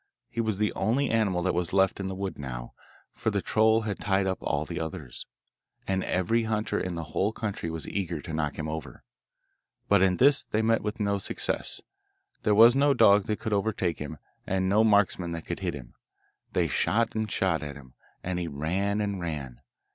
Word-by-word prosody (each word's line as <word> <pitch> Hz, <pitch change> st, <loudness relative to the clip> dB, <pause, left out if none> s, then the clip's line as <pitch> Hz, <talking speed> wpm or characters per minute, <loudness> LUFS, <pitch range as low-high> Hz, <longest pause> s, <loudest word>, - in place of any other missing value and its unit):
He 115 Hz, -, -1 dB
was 110 Hz, -3 st, -1 dB
the 105 Hz, 0 st, 0 dB
only 120 Hz, +8 st, +1 dB
animal 100 Hz, -6 st, +1 dB
that 95 Hz, -, +1 dB
was 90 Hz, 0 st, -1 dB
left 95 Hz, 0 st, +3 dB
in 95 Hz, -, -3 dB
the 95 Hz, -, -4 dB
wood 95 Hz, -3 st, -4 dB
now, -, -, -6 dB, 0.4 s
for -, -, -2 dB
the 100 Hz, -2 st, 0 dB
troll 110 Hz, +3 st, +3 dB
had 105 Hz, -3 st, -3 dB
tied 95 Hz, -1 st, +1 dB
up 95 Hz, -1 st, -1 dB
all 70 Hz, +2 st, -1 dB
the 85 Hz, +1 st, -5 dB
others, 80 Hz, -5 st, -6 dB, 0.6 s
and 95 Hz, -1 st, 0 dB
every 110 Hz, +6 st, +1 dB
hunter 110 Hz, 0 st, -1 dB
in 90 Hz, -1 st, -3 dB
the 85 Hz, -, -3 dB
whole 100 Hz, +3 st, +1 dB
country 105 Hz, -6 st, -4 dB
was 80 Hz, -1 st, -5 dB
eager 90 Hz, -5 st, -2 dB
to 80 Hz, +3 st, -7 dB
knock 75 Hz, -2 st, -1 dB
him 75 Hz, -, -3 dB
over. 80 Hz, 0 st, -6 dB, 0.8 s
But 100 Hz, -2 st, +4 dB
in 95 Hz, -2 st, +3 dB
this 140 Hz, +2 st, +5 dB
they 110 Hz, +1 st, -1 dB
met 115 Hz, 0 st, +3 dB
with 105 Hz, +2 st, -4 dB
no 100 Hz, -1 st, +1 dB
success; -, -, -1 dB, 0.6 s
there 105 Hz, -2 st, +2 dB
was 115 Hz, +3 st, +8 dB
no 140 Hz, 0 st, +4 dB
dog 105 Hz, -4 st, +5 dB
that 105 Hz, -, -1 dB
could 110 Hz, -3 st, -2 dB
overtake 100 Hz, -4 st, 0 dB
him, 75 Hz, -2 st, -6 dB, 0.3 s
and 95 Hz, 0 st, 0 dB
no 105 Hz, +3 st, +4 dB
marksman 100 Hz, -5 st, +2 dB
that 85 Hz, -1 st, -6 dB
could -, -, -4 dB
hit -, -, -2 dB
him. 60 Hz, -4 st, -10 dB, 0.6 s
They 85 Hz, -2 st, +2 dB
shot 110 Hz, -, +1 dB
and 110 Hz, -1 st, -2 dB
shot 85 Hz, -6 st, +1 dB
at 75 Hz, -1 st, -6 dB
him, 65 Hz, -3 st, -14 dB, 0.3 s
and 90 Hz, 0 st, -2 dB
he 85 Hz, -, -2 dB
ran 95 Hz, +8 st, -1 dB
and 100 Hz, -3 st, -2 dB
ran. 70 Hz, -7 st, -5 dB
95 Hz, 205 wpm, -28 LUFS, 85-110 Hz, 0.8 s, was